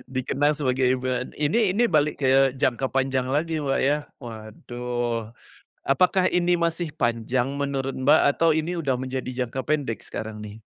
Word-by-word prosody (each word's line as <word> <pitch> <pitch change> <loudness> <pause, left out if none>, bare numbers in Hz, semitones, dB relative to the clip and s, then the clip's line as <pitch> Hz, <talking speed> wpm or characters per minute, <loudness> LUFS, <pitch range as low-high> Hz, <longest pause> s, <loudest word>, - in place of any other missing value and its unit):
dikenang 145 +3 +1
sebagai 130 -2 +1
ibu 125 - -8
an 125 0 -4
ini 185 +6 +1
ini 240 - +4
balik 150 -7 +2
ke 135 0 +4
jangka 130 +1 0
panjang 130 -1 0
lagi, 155 +3 0
Mbak, 135 -2 0
ya, 145 +2 +2 0.2
waduh. 120 0 -5 0.6
Apakah 180 +6 +3
ini 175 0 +1
masih 170 -1 -1
panjang 120 +2 0
menurut 135 -1 -2
Mbak, 145 +4 +4 0.2
atau 165 -1 +4
ini 160 +3 -1
udah 135 -7 -1
menjadi 130 0 -4
jangka 130 +2 -5
pendek 145 -7 -2
sekarang, 110 -1 -6
nih? 105 +1 -10
135 Hz, 155 wpm, -24 LUFS, 125-155 Hz, 0.6 s, ini